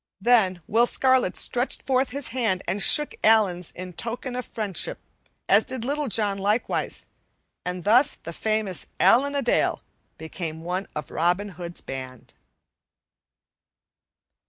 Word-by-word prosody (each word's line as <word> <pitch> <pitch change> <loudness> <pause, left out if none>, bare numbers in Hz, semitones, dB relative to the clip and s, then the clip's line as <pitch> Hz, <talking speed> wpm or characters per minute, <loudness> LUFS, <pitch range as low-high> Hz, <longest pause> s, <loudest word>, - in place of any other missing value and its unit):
Then 195 -5 +3
Will 235 +3 +3
Scarlet 260 -8 +2
stretched 245 +2 0
forth 260 0 +1
his 280 0 -3
hand 225 -7 -1
and 190 +4 -1
shook 295 +8 +2
Allan's 200 -6 +3
in 180 0 -8
token 240 +6 -4
of 250 - -3
fellowship, 205 -6 -3 0.5
as - - +5
did 255 -3 -2
Little 290 +2 -1
John 205 -3 +2
likewise. 210 +4 -1 0.6
And 180 0 -4
thus 245 +7 +4
the 170 - -9
famous 215 -2 -1
Allan 265 +9 +4
a 280 - 0
Dale 240 - +1 0.3
became 160 0 -6
one 180 +3 -3
of 150 - -5
Robin 180 +5 +1
Hood's 175 -2 -8
band. 130 -2 -8
205 Hz, 135 wpm, -25 LUFS, 180-245 Hz, 0.6 s, as